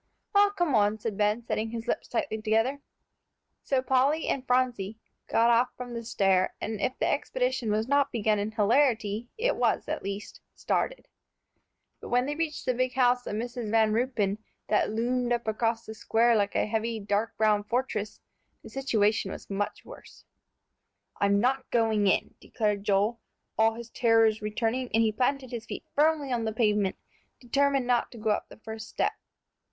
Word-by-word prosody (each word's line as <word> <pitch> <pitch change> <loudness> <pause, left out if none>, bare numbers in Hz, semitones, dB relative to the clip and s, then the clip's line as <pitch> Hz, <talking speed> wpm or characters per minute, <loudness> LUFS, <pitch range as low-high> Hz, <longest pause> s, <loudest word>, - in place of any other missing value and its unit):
"Well, 405 0 +6
come 350 -7 -1
on," 210 -1 +3
said 215 -1 -4
Ben, 210 +3 +1
setting 220 -1 -2
his 230 +1 -6
lips - - -2
tightly 290 -10 -2
together. 225 +6 +1 0.8
So 265 -2 0
Polly 265 +5 +2
and 260 -1 -2
Phronsie 245 -5 0 0.3
got 230 +1 +3
off 235 +2 +3
from 245 -1 -7
the 235 0 -5
stair, 195 -5 +1
and 215 -2 -4
if 255 - -1
the - - 0
expedition - - -1
was 215 +2 0
not 280 0 +2
begun 215 -2 +1
in 205 +1 -1
hilarity, 225 0 +1
it - - +1
was - - +1
at - - -3
least 200 +1 -6
started. - - -2 0.9
But - - -9
when 245 +1 +2
they 290 - -2
reached 310 -1 -3
the 255 - +2
big 255 +1 -1
house 250 -1 +2
of - - -3
Mrs. 235 0 -4
Van 220 -1 +3
Ruypen, 220 -4 0 0.3
that 210 - +2
loomed 240 +3 -1
up 235 -1 -2
across 225 +1 0
the 220 - -7
square 230 +2 +2
like 205 -2 0
a - - +2
heavy, 225 +1 -2
dark 205 +2 -1
brown 215 -1 +3
fortress, 220 -2 -2 0.4
the - - -11
situation 215 -7 +1
was - - -9
much 205 +1 -3
worse. - - -14 0.9
"I'm 200 0 +3
not 260 +4 0
going 220 -3 +2
in," - - +1
declared 210 -3 -2
Joel, 210 +4 +2 0.4
all 225 0 +3
his 235 0 -9
terrors 225 -2 +3
returning, 225 +4 -1
and 225 - +4
he 220 - +2
planted 260 +3 -1
his 235 -2 -6
feet - - -6
firmly 295 -2 +2
on 235 -2 0
the 220 - -2
pavement, 210 -4 +1 0.4
determined 275 +1 +1
not 245 -1 +1
to - - -10
go 215 -1 0
up - - -2
the - - -13
first 220 0 -8
step. - - 0
230 Hz, 180 wpm, -28 LUFS, 215-255 Hz, 0.9 s, Well